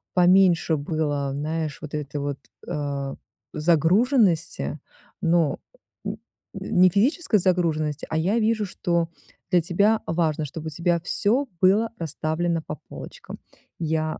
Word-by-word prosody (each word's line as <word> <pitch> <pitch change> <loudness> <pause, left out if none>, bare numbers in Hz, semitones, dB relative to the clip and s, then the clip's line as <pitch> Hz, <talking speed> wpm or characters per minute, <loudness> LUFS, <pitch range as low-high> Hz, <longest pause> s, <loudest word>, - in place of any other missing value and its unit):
поменьше 180 -2 +5
было, 145 -2 -1
знаешь, 155 +1 -3
вот 150 - -8
этой 150 -1 -4
вот, 140 -1 -3 0.3
э, 140 -2 -3 0.4
загруженности, 170 - +2 0.4
но, 165 -4 +2 0.5
м, - - -2 0.4
н - - -2
не 185 - +8
физической 225 - +2
загруженности, 160 -5 0
а 160 - -1
я 195 +8 +1
вижу, 220 -1 +1
что 170 -3 -1 0.4
для 175 -1 +5
тебя 200 +6 +2
важно, 160 -2 0
чтобы 160 +3 -7
у - - -2
тебя 170 +2 0
всё 235 +10 +1
было 210 +5 +4
расставлено 165 +1 -1
по 150 - -5
полочкам. - - -9 0.4
Я 155 -1 -1
165 Hz, 125 wpm, -24 LUFS, 155-185 Hz, 0.5 s, не